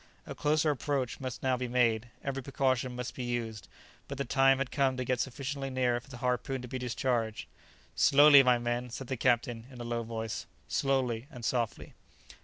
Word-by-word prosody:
A - - -6
closer 150 +1 +2
approach 140 -3 -2
must 130 -3 -6
now 130 -1 +2
be 125 0 -3
made; 120 -2 +2 0.2
every 135 -1 -3
precaution 130 -2 0
must 125 0 -5
be 125 - -5
used; 115 -4 -3 0.4
but 140 - -6
the 140 - -2
time 135 -1 +4
had 135 -1 -2
come 135 -3 +1
to 130 - -2
get 125 0 0
sufficiently 135 +1 -3
near 125 -2 +1
for 120 - -19
the 125 - -9
harpoon 125 +2 -1
to - - -6
be 130 +2 -4
discharged. 120 -2 -1 0.5
"Slowly, 145 0 +8
my 125 -2 +4
men," 120 +1 -2
said 130 +3 -6
the 130 - -3
captain, 120 0 0
in 130 -2 -12
a - - -5
low 120 0 -2
voice; 115 -1 -5 0.2
"slowly 130 -3 0
and 120 -3 -8
softly!" 120 -3 -2
125 Hz, 195 wpm, -30 LUFS, 120-135 Hz, 0.5 s, Slowly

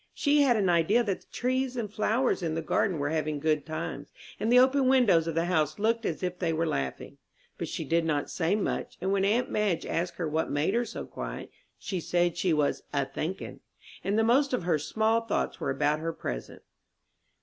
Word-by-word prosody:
She 290 0 +3
had 265 -4 +4
an 200 -3 +1
idea 175 +7 +3
that 200 -4 -2
the - - -25
trees 255 0 -1
and 230 -3 -2
the 205 - -23
flowers 225 +2 +1
in 160 -2 -2
the 165 - -2
garden 180 +2 +1
were 145 0 -1
having 155 -1 -1
good 155 0 0
times, 160 +1 -5 0.3
and 225 - 0
the 250 - +7
open 260 +1 +5
windows 220 -11 +4
of 165 - -2
the 165 +1 +1
house 155 -4 +1
looked 225 +2 +1
as - - -4
if 180 0 -3
they 170 -3 0
were 165 +1 0
laughing. 70 - -3 0.4
But - - -3
she - - -4
did 165 0 +2
not 150 -3 0
say 175 +3 +1
much, 210 - -3
and 190 - -1
when 195 -1 +2
aunt 235 +5 +1
Madge 205 -6 0
asked 175 +1 -2
her 170 -2 -2
what 160 +1 -1
made 145 +7 0
her 240 +1 +1
so - - -6
quiet, - - -7 0.3
she 190 - -4
said 175 +1 +1
she 185 - 0
was 150 -2 +1
"a 140 -1 0
thinkin'." 180 +8 -5 0.4
And 200 +2 0
the 225 - +4
most 260 +4 +3
of 250 - 0
her 165 -3 +1
small 220 +8 +1
thoughts 230 -2 -2
were - - -2
about 145 +3 +1
her 165 +1 -3
present. - - -6
180 Hz, 220 wpm, -28 LUFS, 160-225 Hz, 0.4 s, the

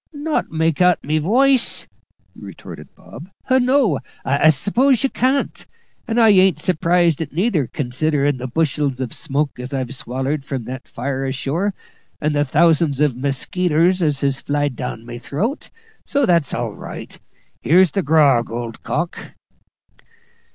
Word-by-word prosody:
"Not 300 0 -2
make 160 +1 0
out 180 -1 +5
my 155 +2 0
woice!" 255 - +2 0.5
retorted - - -11
Bob. 175 - -12 0.2
"No, 255 - +3 0.3
I 140 +3 +3
s'pose 235 - +2
you 270 - +1
can't. 265 +2 0 0.4
And 230 +1 0
I 225 -1 +6
ain't 190 -4 +4
surprised 170 -1 +1
at 160 - -2
it 145 - -22
neither, 175 - +1
considerin' 145 +2 -1
the 130 +1 -5
bushels 145 -1 -1
of 130 -3 -4
smoke 140 -1 -2
as 125 +3 -5
I've 130 -1 -3
swallered 135 +2 -3
from 135 -3 -4
that 130 +3 -8
fire 135 +2 -4
ashore, 150 +9 -2 0.4
and 150 0 0
the 145 0 +2
thousands 155 0 +2
of 145 -4 +2
muskeeters 165 +7 0
as 150 -4 0
has 140 -1 0
flied 145 -2 -1
down 115 -3 -6
my 120 0 -8
throat; 200 - -3 0.3
so 280 -1 +1
that's 170 - +2
all - - -3
right. - - -9 0.4
Here's 180 +2 +4
the 195 - 0
grog, 140 -7 +3
old 115 0 -6
cock." - - -4
150 Hz, 150 wpm, -19 LUFS, 135-185 Hz, 0.5 s, I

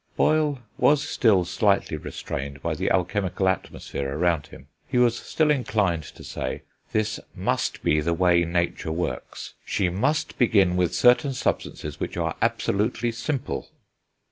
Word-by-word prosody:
Boyle 155 -2 +2 0.2
was 145 0 +4
still 100 -7 +3
slightly 100 -2 +1
restrained 70 -1 -5
by - - 0
the - - -1
alchemical 95 +1 0
atmosphere 70 -6 -2
around 85 -3 +1
him; - - -14 0.2
he 130 - -1
was 120 -1 +4
still 155 +4 +1
inclined 105 - +1
to 75 - -12
say, - - -4 0.3
"this 110 0 0 0.2
must - - -1
be 75 - +3
the 85 +3 0
way 90 -1 +4
nature 85 -1 -1
works, 80 -7 -4
she 95 -3 0
must 130 - -1
begin 100 -7 +4
with 90 -1 +1
certain 125 +3 +4
substances 125 - -3
which - - -4
are - - -1
absolutely 115 +3 0
simple." 130 +4 -3
100 Hz, 145 wpm, -25 LUFS, 85-125 Hz, 0.3 s, was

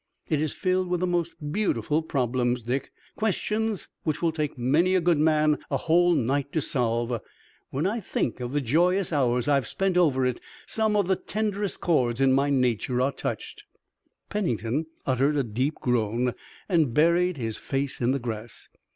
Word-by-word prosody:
It 150 -2 +1
is 155 - 0
filled 185 -1 0
with 180 -1 0
the - - +2
most 170 -2 -1 0.2
beautiful 155 - 0
problems, 125 -4 0
Dick, 130 +4 -2 0.2
questions 215 0 -1
which 155 -2 -1
will 170 -1 +1
take 155 -3 -3
many 155 +10 +2
a - - +5
good 170 -3 +2
man 155 -1 +3
a - - +1
whole 175 +2 +3
night 140 +1 0
to 160 - +2
solve. 120 -5 -1 0.5
When 140 +5 -2
I 215 +5 0
think 150 - -2
of 120 0 -4
the 145 +1 0
joyous 175 +8 +2
hours 125 -4 +1
I've 140 -3 +2
spent 195 -2 0
over 140 -7 +3
it 125 -1 -1 0.3
some 220 -1 0
of 200 -3 +2
the 190 - +3
tenderest 205 0 -3
chords 125 -8 +1
in 135 -1 +4
my 140 +2 +2
nature 125 -2 +1
are 130 +2 +2
touched." 135 - -5 0.6
Pennington 145 - -1 0.2
uttered 135 +3 +2
a 140 - +2
deep 125 +7 -1
groan 120 0 0 0.3
and 160 - +2
buried 170 +2 +3
his 115 -3 -3
face 135 -1 -3
in 120 - +2
the 135 - +2
grass. 115 -3 -7
145 Hz, 175 wpm, -26 LUFS, 125-175 Hz, 0.6 s, a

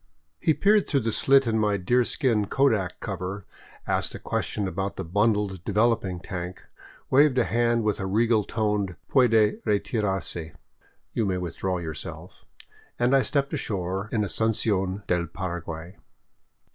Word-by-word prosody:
He 160 - +2
peered 205 0 +3
through 140 -3 +1
the 115 0 -1
slit 135 +4 +4
in 110 -1 +1
my 105 -1 +2
deerskin 115 - +1
kodak 110 -10 +1
cover, 95 0 -5 0.4
asked - - -1
a - - -7
question 105 -2 -2
about 95 +2 -3
the 95 - -4
bundled 100 0 +1
develop. 115 +3 +2
ing 90 -2 -4
tank, 90 0 -6 0.5
waved 140 0 +5
a 125 - +5
hand 120 0 +1
with 105 -2 0
a 95 - -2
regal 110 +2 +2
toned 105 -4 -1
" - - -44
Puede 115 -5 +4
retirarse," 95 -6 -2 0.3
(" - - -37
You 110 - 0
may 95 -1 0
withdraw 90 +1 -2
yourself"), 80 -4 -8 0.5
and 125 +3 +3
I 135 - +5
stepped 140 +1 -1
ashore 95 0 -2
in 110 -2 +1
Asuncion 100 -2 0
del 90 -2 0
Paraguay. 85 0 -6
105 Hz, 150 wpm, -26 LUFS, 95-115 Hz, 0.5 s, waved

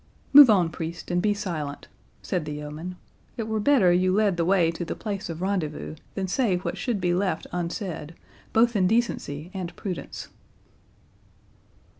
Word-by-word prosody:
"Move 285 -3 +11
on, 190 -5 +5
priest, 170 +1 -6
and 175 0 +2
be 210 +2 +2
silent," 160 -8 -4 0.4
said 180 -5 -2
the 150 - -4
yeoman; 150 +5 -6 0.4
"it 225 -2 -3
were 220 -1 -1
better 210 -7 +4
you 185 +1 +3
led 205 -1 +2
the 170 - 0
way 175 -2 +3
to 170 +1 -5
the - - -4
place 205 -3 -4
of 165 +2 -5
rendezvous, 180 -7 -2 0.2
than 190 -1 -2
say 205 0 +1
what 180 - -4
should 240 -6 -2
be 175 -1 +1
left 185 +1 0
unsaid, 170 -2 -4 0.4
both 235 +1 +3
in 185 -3 +3
decency 180 -8 -1
and 185 -3 -5
prudence." 185 -4 -6
185 Hz, 165 wpm, -26 LUFS, 170-205 Hz, 0.4 s, Move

